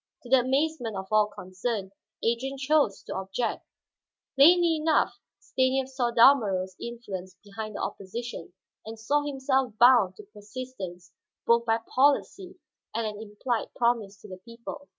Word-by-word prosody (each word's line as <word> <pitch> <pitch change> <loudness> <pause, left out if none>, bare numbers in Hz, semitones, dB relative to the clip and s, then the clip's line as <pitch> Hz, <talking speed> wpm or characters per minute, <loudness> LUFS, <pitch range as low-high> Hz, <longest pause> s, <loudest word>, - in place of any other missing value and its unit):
To 245 - -12
the 265 0 +6
amazement 260 -3 -1
of 190 - -5
all 215 -1 +4
concerned, 195 +1 -5 0.3
Adrian 250 +4 -1
chose 280 -6 +1
to - - -6
object. 195 +5 -3 0.7
Plainly 335 +3 +6
enough 310 +1 +1 0.2
Stanief 260 0 0
saw 260 -2 -1
Dalmorov's 215 -7 +4
influence 195 -6 -7
behind 215 +1 -7
the - - -4
opposition, 195 -2 -6 0.3
and 220 +1 -9
saw 285 +7 +1
himself 265 -3 0
bound 240 -7 +6
to 210 - -12
persistence 205 -4 -9 0.3
both 235 0 +3
by 225 0 +3 0.2
policy 290 +8 +1 0.4
and 230 0 -1
an 210 0 -5
implied 220 +2 -4
promise 230 -5 0
to - - -12
the 185 - -9
people. 235 +7 -10
235 Hz, 140 wpm, -27 LUFS, 205-265 Hz, 0.7 s, the